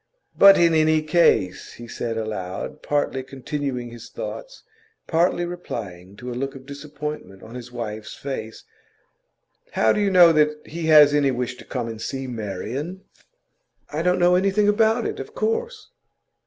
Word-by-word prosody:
'But, 195 0 +8
in 170 -1 +4
any 155 0 +3
case,' 150 - +2
he 120 - -11
said 115 -1 -4
aloud, 110 +5 -5
partly 145 -2 -1
continuing 130 -2 -5
his 120 -1 -11
thoughts, - - -8 0.4
partly 175 +1 +1
replying 100 - -7
to 125 +4 -7
a - - -4
look 135 +3 -4
of 130 -1 -11
disappointment 145 -6 -7
on 110 - -11
his 125 -1 -9
wife's 110 -3 -6
face, 120 -5 -6 1.1
'how 110 - +3
do - - -1
you 200 - +2
know 175 -3 +7
that 150 0 +1
he 165 0 -5
has 150 -2 +7
any 145 -2 +3
wish 125 -1 -2
to - - -13
come 125 -3 -4
and 115 -1 -7
see 135 +3 -4
Marian?' 125 - -5 0.9
'I 150 +2 -2
don't 180 +1 +2
know 175 0 +4
anything 195 +3 +2
about 220 +2 +3
it, - - -3
of 445 +2 -8
course. 460 -1 -2
145 Hz, 160 wpm, -23 LUFS, 120-175 Hz, 1.1 s, But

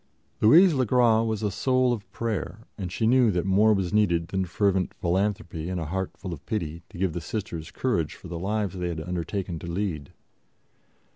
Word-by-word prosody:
Louise 165 - +7
le 130 -2 +2
Gras 120 -2 +4
was 110 -1 -2
a 105 - 0
soul 130 +4 +2
of 105 -4 -7
prayer, 115 -1 -4
and 95 -4 -5
she 110 - -1
knew 125 0 +5
that 90 -3 0
more 100 +3 +4
was 95 -3 0
needed 85 -6 +2
than 95 -1 0
fervent 95 0 0
philanthropy 90 -2 -1
and 90 -1 -2
a 80 - -3
heart 95 +4 -3
full 90 -3 -6
of 75 - -9
pity 85 -6 -3
to - - -12
give 90 -2 0
the 85 - -4
Sisters 85 -3 -5
courage 85 - -1
for - - -12
the 85 - -5
lives 100 0 -1
they 90 - -1
had 85 -2 -3
undertaken 90 +1 -3
to 85 - -8
lead. 85 -5 -3
95 Hz, 200 wpm, -26 LUFS, 85-110 Hz, -, Louise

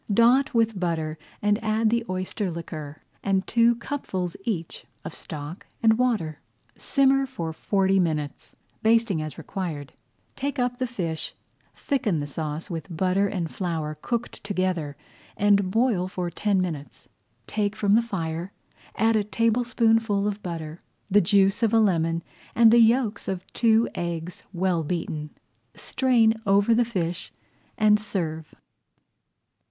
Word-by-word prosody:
Dot 240 +7 +4
with 225 -3 +2
butter 160 -3 -2 0.2
and 205 +2 +2
add 220 0 +2
the 235 0 +1
oyster 185 +1 -2
liquor, 155 -3 -7 0.2
and 195 -1 +1
two 235 +1 +4
cupfuls 190 - -4
each 175 -8 -3 0.2
of - - -5
stock 150 +4 -7 0.2
and 220 0 +5
water. 210 - 0 0.4
Simmer 270 0 +2
for 170 -11 -5
forty 195 +2 +2
minutes, 155 -5 -2 0.3
basting 225 -6 +3
as 155 -1 -6
required. 160 -4 -5 0.4
Take 280 +1 -3
up 245 -1 0
the 255 - 0
fish, 170 -9 -4 0.4
thicken 220 - 0
the 145 - -2
sauce 150 +2 -4
with 165 -3 -5
butter 185 +4 +1
and 175 -5 -3
flour 165 -5 -2
cooked 235 -1 -3
together, 185 -7 -1 0.4
and 200 -2 +3
boil 225 -4 +2
for 180 -2 -4
ten 200 +3 +1
minutes. 155 -8 -5 0.4
Take 210 -1 -1
from 200 -1 +2
the 225 - +6
fire, 175 -5 -4 0.4
add 225 +2 +3
a 215 - +3
tablespoonful 225 -1 +2
of 205 0 -3
butter, 165 -2 -6 0.3
the 205 +2 +6
juice 195 +3 +3
of 225 -1 +3
a - - +6
lemon, 165 -5 +2 0.3
and 230 -1 +7
the 235 - +7
yolks 230 -2 +3
of 185 -1 -3
two 225 -1 +4
eggs 170 0 -4
well 180 -2 0
beaten. 155 -2 -3 0.5
Strain 230 -4 +2
over 200 +3 +4
the 240 +1 +3
fish 180 -6 -3 0.5
and 210 -1 +5
serve. 160 -7 -4
195 Hz, 140 wpm, -25 LUFS, 165-225 Hz, 0.5 s, and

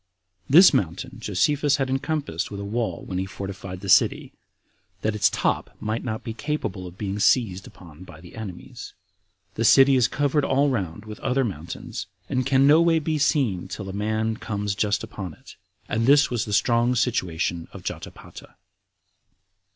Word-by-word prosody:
This 175 +7 +8
mountain 105 +9 -2
Josephus 140 +8 +1
had 135 -2 -1
encompassed 135 - -2
with 100 - -7
a 100 - -5
wall 110 -4 -3
when 90 - -3
he 95 - -2
fortified 95 -1 -7
the 100 - -7
city, 95 - +3 0.7
that 110 - +1
its 105 - +3
top - - -2
might 110 +1 -3
not 110 -3 -4
be 115 - -5
capable 115 -9 -4
of 90 +1 -12
being 100 0 -3
seized 100 -4 +2
upon 85 -1 -14
by 80 -4 -13
the 85 +1 -14
enemies. 100 -6 -8 0.6
The 115 - -2
city 135 +4 +6
is 125 -2 +4
covered 145 0 0
all 140 +1 +2
round 100 -3 -3
with 105 -1 -9
other 135 +1 0
mountains, 85 - -6 0.2
and 130 0 0
can 135 0 +4
no 150 +3 +6
way 170 -1 +4
be 155 -1 -1
seen 135 - +1
till 100 - -7
a - - -6
man 110 +2 -1
comes 105 -2 -3
just 105 +1 0
upon 95 -8 -7
it. - - -15 0.3
And 115 +2 0
this 145 0 +5
was 120 -3 -1
the 105 - -6
strong 120 +4 +2
situation 90 -8 -1
of - - -11
Jotapata. - - -9
110 Hz, 175 wpm, -24 LUFS, 95-135 Hz, 0.7 s, This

